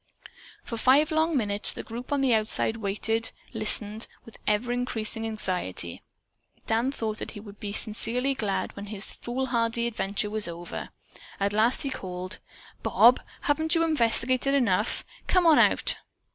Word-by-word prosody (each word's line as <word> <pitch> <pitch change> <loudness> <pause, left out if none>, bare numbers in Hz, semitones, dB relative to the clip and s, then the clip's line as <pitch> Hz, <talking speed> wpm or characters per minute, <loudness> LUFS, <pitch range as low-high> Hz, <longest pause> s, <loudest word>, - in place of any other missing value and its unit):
For - - -9
a 275 +4 +6
long 315 +1 +3
five - - +2
minutes 205 -3 +4
the - - -7
group 240 +4 -8
on 285 -1 +1
the 260 -3 +3
outside 220 0 +3
waited, 225 +2 -1 0.2
listening 215 0 +1 0.2
with 230 - -14
ever 210 +4 +1
increasing 225 -2 -2
anxiety. 180 - -3 0.6
Dan 230 +4 +1
thought 220 -5 -3
that - - -5
he - - -6
would 205 -1 -12
be 205 - -5
sincerely 235 +5 -1
glad 210 -7 -2
when 200 - -7
this 205 -1 -3
foolhardy 240 -2 -2
adventure 210 -2 -2
was 215 -2 -2
over. 170 0 -6 0.5
At 200 0 0
last 225 +4 +4
he 275 - -2
called: 185 -5 -5 0.4
"Bob, - - +5 0.2
haven't 315 +3 +1
you 330 - +3
investigated 255 -2 +1
enough? 215 -6 +1 0.2
Come 365 -2 +3
on 320 -3 +7
out!" - - +4
225 Hz, 155 wpm, -27 LUFS, 210-255 Hz, 0.6 s, on